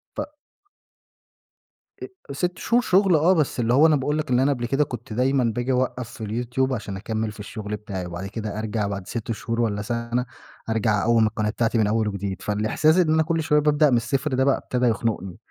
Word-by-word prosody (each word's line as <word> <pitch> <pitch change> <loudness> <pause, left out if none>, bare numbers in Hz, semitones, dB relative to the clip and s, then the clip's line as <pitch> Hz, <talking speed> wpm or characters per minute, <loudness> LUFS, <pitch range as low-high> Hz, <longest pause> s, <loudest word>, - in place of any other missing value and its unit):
ف - - -3 1.8
ا 380 - -10
6 180 +5 -2
شهور 240 +1 +2
شغل 190 -5 +3
آه، 165 +5 +4
بس 150 -6 0
اللي 120 +1 +2
هو 150 +5 +6
أنا 155 - +4
باقول 145 +2 -1
لك 155 0 -3
اللي 125 +1 +4
أنا 140 - +3
قبل 120 -3 -4
كده 135 +5 +2
كنت 120 -4 -7
دايمًا 130 +3 +2
باجي 120 +2 -1
أوقّف 125 -1 -1
في 110 - -7 0.2
الYouTube، 130 +2 0
عشان 100 -4 -4
أكمل 110 +1 -3
في 105 - -14
الشغل 105 0 -5
بتاعي، 100 -3 -6
وبعد 90 +2 -6
كده 105 0 -5
أرجع 110 -1 -2
بعد 100 -2 -5
6 115 -1 -4
شهور 115 +1 -2
والّا 105 -3 0
سنة 115 +2 -2 0.4
أرجع 110 -2 +1
أقوّم 115 0 +4
القناة 105 0 -1
بتاعتي 115 +1 0
من 110 -2 +3
أول 110 0 +1
وجديد. 100 -2 -4
فالإحساس 110 - +2
إن 165 -4 +3
أنا 160 0 +3
كل 165 0 -1
شوية 150 -1 +3
بابدأ 150 0 +3
من 125 - +3
الصفر 135 +4 -1
ده 130 - +2
بقى 135 0 +3
ابتدى 125 0 -1
يخنقني، 110 -5 -1
120 Hz, 210 wpm, -24 LUFS, 110-140 Hz, 1.8 s, هو